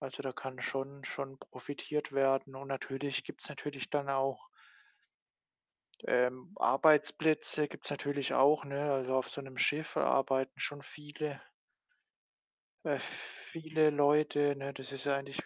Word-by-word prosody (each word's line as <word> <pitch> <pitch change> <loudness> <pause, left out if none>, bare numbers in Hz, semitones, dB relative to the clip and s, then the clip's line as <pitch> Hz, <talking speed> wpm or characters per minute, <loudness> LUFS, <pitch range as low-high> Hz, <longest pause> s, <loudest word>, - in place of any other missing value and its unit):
Also, 130 - -6
da 135 -2 -3
kann 130 -1 -7
schon 135 +1 -3
schon 135 0 -5
profitiert 150 0 -5
werden 135 0 +2
und 135 +1 -8
natürlich 135 0 -3
gibt’s - - -9
natürlich 145 -2 -5
dann 140 -1 0
auch 135 -1 0 1.6
ähm, 125 +8 +1
Arbeitsplätze 155 0 +4
gibt’s - - -9
natürlich 145 -1 -1
auch, 145 +3 +5
ne, 140 +1 -2
also 130 -1 0
auf 130 - +1
so 140 - -6
’nem 130 -1 -11
Schiff 150 +1 +1
arbeiten 135 -1 +2
schon 145 -1 -2
viele 150 -1 -6 1.4
äh, - - +1
viele 160 -1 -1
Leute, 145 0 +4
ne? 140 0 -5
Das 135 +1 -8
ist 135 - -5
ja 140 -1 +3
eigentlich 140 0 -5
140 Hz, 135 wpm, -33 LUFS, 135-145 Hz, 1.6 s, auch